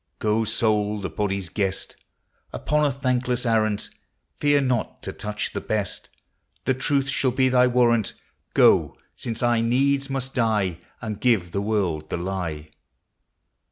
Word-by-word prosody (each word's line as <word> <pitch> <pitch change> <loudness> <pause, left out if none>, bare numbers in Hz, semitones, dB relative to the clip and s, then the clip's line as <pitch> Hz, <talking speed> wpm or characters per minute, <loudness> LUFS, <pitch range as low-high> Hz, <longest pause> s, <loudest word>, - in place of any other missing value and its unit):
Goe, 110 +1 +1
soule, 105 -1 +1
the 95 -4 -4
bodie's 100 0 -2
guest, 95 -1 -2 0.6
Upon 150 +1 0
a 145 - +3
thanklesse 125 -2 -1
arrant; 110 -3 +1 0.4
Feare 145 0 +3
not 125 -4 -1
to - - -5
touche 105 0 -3
the - - -3
best - - -3 0.3
— 80 +4 -40
The 130 - +3
truth 135 +1 +1
shall 135 -1 +1
be 130 +1 +2
thy 125 0 +5
warrant; 120 -3 +2 0.4
Goe, - - +5 0.2
since 115 0 -4
I 120 -1 +3
needs 135 +4 +1
must 135 -1 -3
dye, 105 -8 +1 0.2
And 110 -2 -4
give 110 -9 +2
the 100 - -1
world 95 -8 -1
the - - -2
lye. 85 -4 -4
115 Hz, 150 wpm, -24 LUFS, 100-130 Hz, 0.6 s, thy